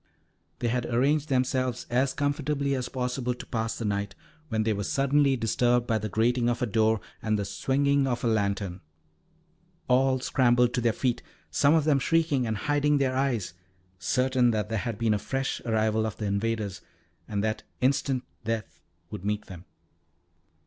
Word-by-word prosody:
They 120 - -1
had 120 0 -1
arranged 140 +5 +1
themselves 130 -2 0
as 130 +2 +2
comfortably 145 0 0
as 125 -2 -2
possible 125 -1 -2
to - - -9
pass 115 -1 -2
the 115 - -4
night, 100 -1 -2 0.3
when 110 -2 0
they 110 0 +1
were 100 0 -3
suddenly 140 +1 +2
disturbed 120 +1 +2
by 110 -2 +1
the 110 +1 -4
grating 120 +4 +2
of 120 +1 -1
a - - +3
door 110 0 +2 0.2
and 110 -1 0
the 100 - -2
swinging 140 +5 +1
of 120 -2 -2
a - - +2
lantern. 100 -4 -1 1.1
All 130 +1 +3
scrambled 125 -2 +3
to 125 - 0
their 115 -1 +3
feet, 120 +1 -1 0.3
some 145 +2 +4
of 160 - +3
them 145 -2 +3
shrieking 150 -4 +1
and 110 -1 -1
hiding 145 +4 +2
their 130 -2 +1
eyes, 125 -10 0 0.5
certain 125 +4 +2
that 105 -2 -1
there 110 -1 -1
had 115 -1 -3
been 115 -1 +2
a 105 - 0
fresh 135 +5 -2
arrival 110 -1 +1
of 110 - -6
the 105 - -3
invaders, 105 0 -2 0.5
and 100 -1 -2
that 110 0 -1 0.2
instant 130 0 +1 0.2
death 115 -1 -4 0.3
would 90 - -6
meet 105 +1 -2
them. 90 -1 -11
120 Hz, 175 wpm, -27 LUFS, 110-135 Hz, 1.1 s, some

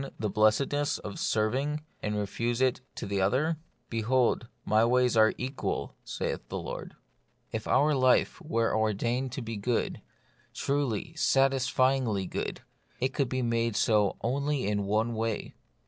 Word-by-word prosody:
the 105 -2 -1
blessedness 135 +8 +2
of 105 - -7
serving, 130 +8 0 0.2
and 105 0 -2
refuse 115 +4 -1
it 130 -1 +2
to - - -5
the 100 -1 -1
other? 140 +12 +2 0.2
" - - -43
Behold, 120 +1 +1 0.2
my 110 +1 +4
ways 125 +1 +3
are 110 0 +5
equal, 130 +2 -3
saith - - -3
the - - -3
Lord." - - -6 0.6
If 110 -1 -4
our 150 +2 +4
life 130 +6 +3
were 115 -9 0
ordained 115 +4 0
to 135 - -4
be 115 -1 -4
good, 115 +4 -1 0.5
truly, 140 +1 -1
satisfyingly 130 -6 +2
good, - - -4 0.4
it 130 +1 0
could 135 -4 0
be 130 -1 -1
made 115 -1 0
so 105 -2 +2
only 140 +3 0
in 100 0 0
one 110 +4 +1
way. 110 -1 -2
120 Hz, 145 wpm, -29 LUFS, 110-135 Hz, 0.6 s, are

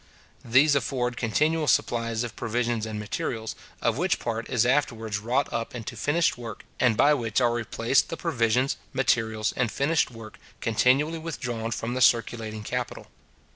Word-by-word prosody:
These 135 +6 +5
afford 125 -2 0
continual 150 +8 +1
supplies 115 -2 +1
of 120 - -6
provisions 120 -1 -1
and 110 -1 -5
materials, 110 +1 -3 0.3
of - - +1
which - - +2
part 115 -1 -4
is 120 -1 +2
afterwards 115 -6 0
wrought 125 +6 0
up 115 +1 -3
into 115 0 -6
finished 145 +4 +1
work 115 -3 -8
and 120 -4 +3
by 145 +1 +5
which 115 -6 0
are 120 -2 +3
replaced 120 +2 +1
the 165 - -4
provisions, 125 -4 +1 0.2
materials, 110 -4 +1
and 120 -3 0
finished 150 +3 +1
work, 115 -3 -11 0.2
continually 135 +8 +2
withdrawn 120 -8 -4
from 115 +1 -3
the 130 - -2
circulating 115 -2 +2
capital. - - -4
120 Hz, 155 wpm, -26 LUFS, 115-135 Hz, 0.3 s, These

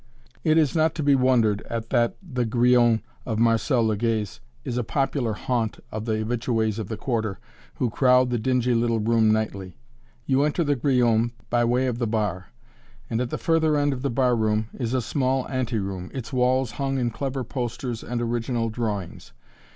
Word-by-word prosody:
It 155 0 +3
is 155 -2 +2
not 160 0 +2
to 155 - -2
be 145 0 +4
wondered 125 -6 +3
at 115 -1 -4
that 120 -2 +2
"The 130 -9 -2
Grillon" 120 -1 +3 0.2
of 110 -3 -3
Marcel 115 +2 +2
Legay's 110 -1 -1 0.2
is 125 -4 -4
a - - -1
popular 135 -1 -1
haunt 115 0 -2
of 110 0 -4
the 110 - 0
habitués 115 -2 -1
of 110 - -4
the 110 - -5
Quarter, 110 -6 -2 0.4
who 120 -3 -1
crowd 125 0 +4
the 120 - 0
dingy 125 +1 +1
little 115 -1 +1
room 110 0 +3
nightly. 100 -4 -2 0.5
You 135 0 +2
enter 150 +4 +1
the 145 -2 +1
"Grillon" 120 -3 +2 0.2
by 120 0 +3
way 125 +2 +2
of 120 -2 -2
the 120 - 0
bar, 105 -5 -2 0.6
and 115 +1 0
at 125 - -2
the - - -3
further 160 -3 +2
end 145 -1 +2
of 125 - -6
the 140 - -1
bar 125 0 +2
room 110 -1 0
is 120 -1 -2
a 125 - 0
small 130 +1 0
anteroom, 105 -8 -3
its 130 0 -6
walls 130 -1 +2
hung 135 +3 -2
in 120 -2 0
clever 135 +2 -3
posters 120 -1 -4
and 120 0 -3
original 115 0 -1
drawings. 105 -6 -4
120 Hz, 185 wpm, -24 LUFS, 110-130 Hz, 0.6 s, be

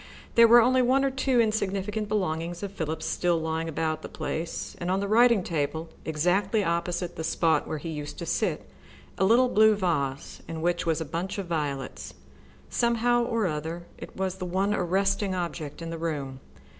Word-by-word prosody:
There 230 0 +7
were 235 0 +7 0.2
one 265 +3 +3
or 270 - +1
two 260 -1 +1
insignificant 210 -1 0
belongings 175 -3 -2
of 200 - -4
Philip's 160 -4 -4
still 175 -1 +1
lying 160 0 -2
about 155 0 -2
the - - -8
place, 165 +1 -4
and 175 - -3
on 190 +1 +1
the 200 - -2
writing 230 -1 +5
table, 160 0 -2 0.2
exactly 185 +7 +1
opposite 170 0 -2
the 160 - -3
spot 160 0 +1
where 155 - -3
he 160 +3 -6
used 150 -2 -6
to - - -5
sit, - - -1 0.5
a 190 - +4
little 240 +5 +5
blue 220 -2 +5
vase, 150 -7 -2
in 160 -1 -5
which 175 0 0
was 165 0 +1
a - - -2
bunch 170 +7 -4
of 200 - -3
violets. 140 - -4 0.5
Somehow 235 0 +2
or 230 -3 0
other 160 +1 -3
it - - -10
was 190 0 -2
the 185 - -4
one 190 +3 0
arresting 195 +1 +1
object 170 -3 -4
in 165 - -5
the 165 - -5
room. 145 -5 -3
175 Hz, 180 wpm, -27 LUFS, 160-205 Hz, 0.5 s, There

